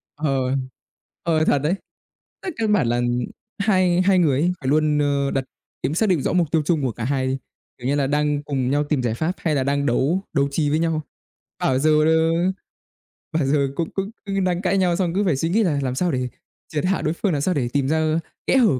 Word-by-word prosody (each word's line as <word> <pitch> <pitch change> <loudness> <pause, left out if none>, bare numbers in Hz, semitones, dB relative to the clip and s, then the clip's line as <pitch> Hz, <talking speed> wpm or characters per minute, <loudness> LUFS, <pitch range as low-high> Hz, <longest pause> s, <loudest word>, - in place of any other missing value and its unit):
Ờ, 145 -1 -1 0.9
ờ, 160 -2 +2
thật 145 - +3
đấy. 160 +5 +1 0.7
Tức 375 - -4
căn 220 -2 +1
bản 180 - +2
là 120 +1 +1 0.6
hai 185 -3 +3
hai 185 0 +4
người 145 -6 +3
ấy 175 +2 +2
phải 130 - -5
luôn, 150 0 +2
ơ, 140 -1 +1
đặt 135 - 0 0.4
kiếm 145 - 0
soát 220 +5 +2
được 180 -5 +3
rõ - - -1
mục 170 -4 +1
tiêu 160 -2 +3
chung 160 -2 +1
của 130 -3 0
cả 110 - -7
hai 130 0 0
đi, 130 +1 -1 0.4
kiểu 125 0 -5
như 140 - +2
là, 140 -2 +1
đang 150 0 0
cùng 135 -3 -1
nhau 145 +2 +2
tìm 145 -2 0
giải 120 -2 0
pháp 160 +9 -1
hay 155 -3 -1
là 135 - +1
đang 140 +1 0
đấu 145 +9 +1
đấu 140 0 +2
trí 145 0 0
với 155 +2 +1
nhau. 165 -1 0 0.6
Bảo 130 - +1
giờ, 155 +3 +3
ờ, 160 0 +3 1.0
bảo 160 -3 0
giờ 140 0 +2
cũng 165 +1 -2
cũng 195 +2 -3 0.3
đang 180 0 0
cãi 195 0 +1
nhau 180 -2 +2
xong 175 -2 0
cứ 200 +3 +1
phải 170 -7 +2
suy 165 +5 -1
nghĩ 220 +5 +3
là 155 -7 +1
làm 130 -1 -2
sao 175 +4 +1
để 130 -1 -1 0.4
triệt 150 +1 -2
hạ 190 +1 +1
đối 155 - 0
phương 190 +3 -1
làm 145 - 0
sao 185 +5 +1
để 125 -6 -1
tìm 140 -2 +1
ra 160 +1 +1 0.3
kẽ - - +4
hở 220 - +4
155 Hz, 235 wpm, -22 LUFS, 140-175 Hz, 1.0 s, hai